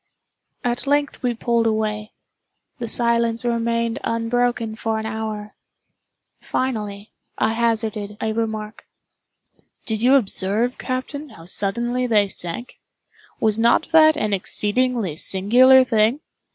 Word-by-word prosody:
At 245 Hz, +2 st, -2 dB
length 285 Hz, 0 st, 0 dB
we 245 Hz, -2 st, 0 dB
pulled 230 Hz, 0 st, +1 dB
away. 215 Hz, -1 st, -2 dB, 0.7 s
The 235 Hz, -, -4 dB
silence 235 Hz, 0 st, 0 dB
remained 230 Hz, 0 st, 0 dB
unbroken 230 Hz, 0 st, -1 dB
for 220 Hz, 0 st, -2 dB
an 220 Hz, -, -4 dB
hour. 220 Hz, -1 st, -5 dB, 0.9 s
Finally, 210 Hz, -5 st, -3 dB, 0.3 s
I 220 Hz, -, +1 dB
hazarded 220 Hz, -3 st, -1 dB
a 220 Hz, -, -1 dB
remark. 220 Hz, -1 st, -4 dB, 1.0 s
"Did 220 Hz, -2 st, -2 dB
you 255 Hz, +3 st, +5 dB
observe, 220 Hz, 0 st, 0 dB
captain, 280 Hz, +3 st, -4 dB
how 165 Hz, -8 st, -14 dB
suddenly 235 Hz, +7 st, -1 dB
they 210 Hz, -4 st, +3 dB
sank? 175 Hz, +8 st, -5 dB, 0.6 s
Was 220 Hz, 0 st, +1 dB
not 235 Hz, +6 st, +3 dB
that 315 Hz, -1 st, +6 dB
an 215 Hz, -1 st, -1 dB
exceedingly 210 Hz, -1 st, 0 dB
singular 250 Hz, +10 st, +5 dB
thing? 230 Hz, +3 st, +1 dB
230 Hz, 115 wpm, -21 LUFS, 215-245 Hz, 1.0 s, that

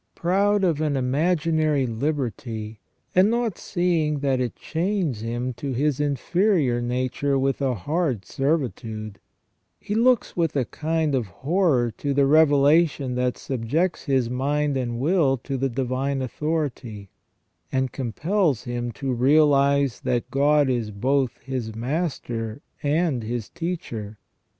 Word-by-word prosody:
Proud 200 Hz, +3 st, +2 dB
of 165 Hz, -5 st, +1 dB
an 150 Hz, -3 st, 0 dB
imaginary 155 Hz, +1 st, +1 dB
liberty, 115 Hz, -4 st, -3 dB, 0.3 s
and 185 Hz, +3 st, +5 dB
not 235 Hz, -4 st, -1 dB
seeing 170 Hz, -4 st, 0 dB
that 135 Hz, -2 st, +1 dB
it 125 Hz, -2 st, -2 dB
chains 165 Hz, -, -2 dB
him 120 Hz, +3 st, -3 dB
to 135 Hz, +3 st, -4 dB
his 145 Hz, +2 st, 0 dB
inferior 145 Hz, -, +1 dB
nature 130 Hz, +3 st, -1 dB
with 135 Hz, +1 st, 0 dB
a 130 Hz, -2 st, +1 dB
hard 135 Hz, -, -1 dB
servitude, 115 Hz, -8 st, -2 dB, 0.6 s
he 205 Hz, -, -4 dB
looks 240 Hz, +2 st, +2 dB
with 165 Hz, -4 st, 0 dB
a 135 Hz, -3 st, +1 dB
kind 160 Hz, +1 st, -1 dB
of 125 Hz, -5 st, 0 dB
horror 135 Hz, -, +1 dB
to 140 Hz, +5 st, -2 dB
a 140 Hz, -, +5 dB
revelation 145 Hz, -1 st, +4 dB
that 125 Hz, 0 st, 0 dB
subjects 140 Hz, +9 st, -1 dB
his 135 Hz, -5 st, +1 dB
mind 140 Hz, +4 st, 0 dB
and 120 Hz, -3 st, -2 dB
will 145 Hz, -2 st, +2 dB
to 135 Hz, +3 st, -5 dB
the 135 Hz, +1 st, 0 dB
divine 130 Hz, +2 st, -1 dB
authority, 130 Hz, -, -3 dB, 0.6 s
and 130 Hz, -1 st, 0 dB
compels 145 Hz, -, 0 dB
him 120 Hz, -1 st, -3 dB
to 135 Hz, +2 st, -3 dB
realise 140 Hz, 0 st, +3 dB
that 120 Hz, 0 st, -2 dB
God 145 Hz, +1 st, +3 dB
is 120 Hz, -4 st, -1 dB
both 130 Hz, +5 st, 0 dB
his 120 Hz, -4 st, -4 dB
master 120 Hz, -3 st, -3 dB, 0.2 s
and 150 Hz, -3 st, +1 dB
his 115 Hz, 0 st, -4 dB
teacher. 115 Hz, -, -5 dB
135 Hz, 130 wpm, -24 LUFS, 120-155 Hz, 0.6 s, and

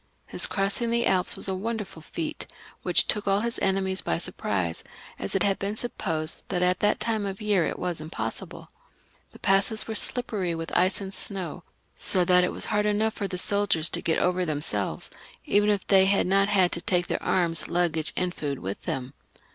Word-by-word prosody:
His -, -, +4 dB
crossing 200 Hz, +4 st, +1 dB
the 235 Hz, 0 st, +1 dB
Alps 185 Hz, -1 st, +2 dB
was -, -, 0 dB
a -, -, 0 dB
wonderftd 195 Hz, -4 st, -4 dB
feat, 315 Hz, -2 st, -4 dB, 0.3 s
which -, -, +3 dB
took 210 Hz, -1 st, -1 dB
all 195 Hz, +1 st, +3 dB
his 235 Hz, 0 st, -1 dB
enemies 190 Hz, 0 st, +1 dB
by 80 Hz, -, -1 dB
surprise, 90 Hz, -3 st, -2 dB, 0.4 s
as 95 Hz, -, -2 dB
it -, -, +3 dB
had 195 Hz, -1 st, +2 dB
been 200 Hz, +2 st, -2 dB
supposed 165 Hz, -9 st, -3 dB
that 180 Hz, -2 st, 0 dB
at 180 Hz, 0 st, +2 dB
that 210 Hz, 0 st, +2 dB
time 220 Hz, -2 st, -1 dB
of 195 Hz, -1 st, -4 dB
year 205 Hz, -6 st, +2 dB
it -, -, -3 dB
was 175 Hz, -3 st, -3 dB
impossible. 115 Hz, -8 st, -6 dB, 0.6 s
The -, -, -15 dB
passes 195 Hz, +3 st, +2 dB
were 225 Hz, -, -3 dB
slippery 210 Hz, -6 st, 0 dB
with 165 Hz, 0 st, -5 dB
ice 185 Hz, +3 st, +3 dB
and 195 Hz, 0 st, -6 dB
snow, 180 Hz, -5 st, -5 dB, 0.3 s
so 185 Hz, -2 st, +1 dB
that 180 Hz, 0 st, +5 dB
it 180 Hz, -, +1 dB
was -, -, -3 dB
hard 210 Hz, 0 st, +2 dB
enough 215 Hz, +1 st, +2 dB
for 200 Hz, -, -3 dB
the 190 Hz, -, -10 dB
men 200 Hz, +3 st, +1 dB
of 205 Hz, -, -1 dB
the -, -, +4 dB
army 160 Hz, -, -4 dB
to -, -, -2 dB
get 165 Hz, -, +1 dB
over 180 Hz, 0 st, +1 dB
themselves, 145 Hz, -, 0 dB, 0.3 s
even 205 Hz, +1 st, +3 dB
if 205 Hz, -2 st, +1 dB
they 190 Hz, -1 st, +5 dB
had 195 Hz, 0 st, +3 dB
not 195 Hz, +2 st, +3 dB
had 185 Hz, -4 st, +3 dB
to 170 Hz, -, +1 dB
take 175 Hz, 0 st, +1 dB
their -, -, -2 dB
arms, 170 Hz, -3 st, +1 dB
luggage, 165 Hz, -3 st, 0 dB
and 180 Hz, -1 st, 0 dB
food 145 Hz, -5 st, -3 dB
with 95 Hz, -2 st, -5 dB
them. 130 Hz, 0 st, -4 dB
190 Hz, 210 wpm, -26 LUFS, 170-205 Hz, 0.6 s, that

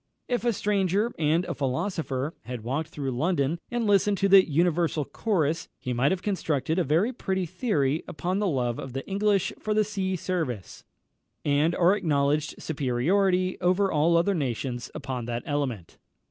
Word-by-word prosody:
If 245 Hz, -1 st, -1 dB
a 240 Hz, -, +4 dB
stranger 205 Hz, +1 st, +1 dB
(and 160 Hz, +3 st, +2 dB
a -, -, -3 dB
philosopher) 145 Hz, 0 st, -2 dB
had 120 Hz, -3 st, -6 dB
walked 140 Hz, +7 st, -2 dB
through 140 Hz, -4 st, -4 dB
London, 150 Hz, +3 st, 0 dB
and 240 Hz, -1 st, -1 dB
listened 205 Hz, 0 st, +3 dB
to 195 Hz, -, +2 dB
the 195 Hz, -2 st, +7 dB
universal 165 Hz, -1 st, +1 dB
chorus, 165 Hz, -, -1 dB
he 125 Hz, -, -4 dB
might 125 Hz, +4 st, +2 dB
have 190 Hz, 0 st, -2 dB
constructed 165 Hz, -4 st, 0 dB
a -, -, +3 dB
very 170 Hz, -, +2 dB
pretty 190 Hz, -5 st, -2 dB
theory 155 Hz, -, 0 dB
upon 180 Hz, +5 st, -2 dB
the 210 Hz, -, +1 dB
love 125 Hz, -7 st, -1 dB
of 130 Hz, -, -7 dB
the 135 Hz, -, -5 dB
English 200 Hz, -1 st, +1 dB
for 215 Hz, 0 st, -1 dB
the 215 Hz, -, +4 dB
sea 195 Hz, -2 st, -2 dB
service, 160 Hz, -, -3 dB, 0.6 s
and 150 Hz, +4 st, +2 dB
our 180 Hz, +3 st, +4 dB
acknowledged 150 Hz, -5 st, 0 dB
superiority 180 Hz, +7 st, +1 dB
over 185 Hz, +2 st, +2 dB
all 160 Hz, +3 st, +3 dB
other 170 Hz, +4 st, +2 dB
nations 125 Hz, -, -3 dB
upon 125 Hz, -3 st, -4 dB
that 120 Hz, 0 st, -3 dB
element. 135 Hz, -, -3 dB
165 Hz, 165 wpm, -26 LUFS, 140-195 Hz, 0.6 s, the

